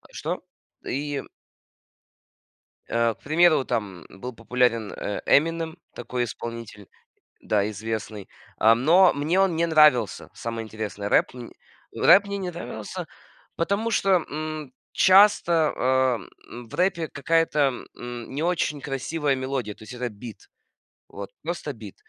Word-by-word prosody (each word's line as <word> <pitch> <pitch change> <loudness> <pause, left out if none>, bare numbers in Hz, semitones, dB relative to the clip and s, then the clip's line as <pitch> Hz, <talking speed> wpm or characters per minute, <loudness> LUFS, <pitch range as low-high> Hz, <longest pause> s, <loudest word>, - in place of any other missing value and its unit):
А, - - -19
что? - - -4 0.5
И 145 0 -2 1.7
э, 115 -1 +1
к - - -35
примеру, 155 -1 +4
там 105 -7 -3
был 125 +6 -8
популярен, 115 -1 0
э, 100 - -4
"Эминем", 165 +2 +2 0.2
такой 120 +1 -3
исполнитель, 115 -3 -7 0.5
да, 105 -1 0
известный. 110 -1 -5 0.3
Ам, 115 +2 +4
но 180 +5 +6
мне 155 +6 0
он 190 -3 +3
не 165 +1 +2
нравился, 150 - +4
самое 115 -1 -5
интересное, 105 -2 -5
рэп, - - +3
м. 125 -2 -9 0.4
Рэп 205 - +6
мне 200 0 -3
не 190 -2 -3
нравился, 170 - -6 0.5
потому 200 +7 -1
что, 190 -5 +2
м, 155 -2 -5 0.2
часто, 185 -5 +5
а, 130 -1 +2 0.5
в - - -16
рэпе 175 -3 +1
какая-то 165 +2 0 0.4
н 120 -1 -7
не 145 +4 -2
очень 165 -4 0
красивая 140 +2 -1
мелодия, 130 -4 -3
то - - -15
есть 115 - -10
это 125 0 -3
бит. 110 0 -11 0.6
Вот 100 0 -8
просто 165 -2 -4
бит. 110 -6 -11
130 Hz, 135 wpm, -25 LUFS, 115-165 Hz, 1.7 s, но